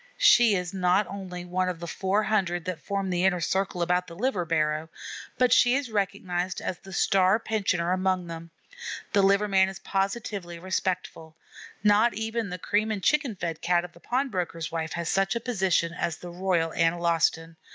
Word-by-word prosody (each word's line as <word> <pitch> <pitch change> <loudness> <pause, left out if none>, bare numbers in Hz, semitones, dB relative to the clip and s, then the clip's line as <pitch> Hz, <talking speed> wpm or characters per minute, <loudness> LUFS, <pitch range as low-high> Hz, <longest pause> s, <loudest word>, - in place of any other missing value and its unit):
She 240 - +6
is 180 -1 -3
not 185 +2 +2
only 185 -3 -7
one 185 +1 -1
of 175 -2 -5
the 170 - -6
four 190 +5 0
hundred 185 -6 0
that 185 -3 -4
form 195 -1 -2
the 175 0 0
inner 190 -2 +3
circle 185 +1 -1
about 180 +1 +1
the 170 - -10
liver 200 -3 -1
barrow, 155 -1 0 0.5
but 250 -1 +4
she 245 0 +5
is 270 -4 -2
recognized 185 -3 -2
as 180 - -4
the 195 - -13
star 190 +2 +3
pensioner 185 -6 0
among 185 -1 0
them. 165 0 -8 0.6
The 200 - +5
liver 200 +2 +3
man 190 -1 +3
is 190 - -8
positively 195 -3 -3
respectful. 180 -3 -3 0.5
Not 210 +2 +4
even 220 0 -2
the 180 - -5
cream 210 +5 0
and 205 -3 -3
chicken 295 -7 +2
fed 165 -3 -4
Cat 175 0 +2
of 175 - -12
the - - -17
pawn 260 +8 -1
broker's 170 -5 -3
wife 160 -1 -3
has 170 -1 -3
such 195 +4 +1
a - - 0
position 190 -8 0
as 170 -2 -2
the 175 - -9
Royal 175 -2 0
Analostan. 165 -1 +1
185 Hz, 185 wpm, -27 LUFS, 170-200 Hz, 0.6 s, She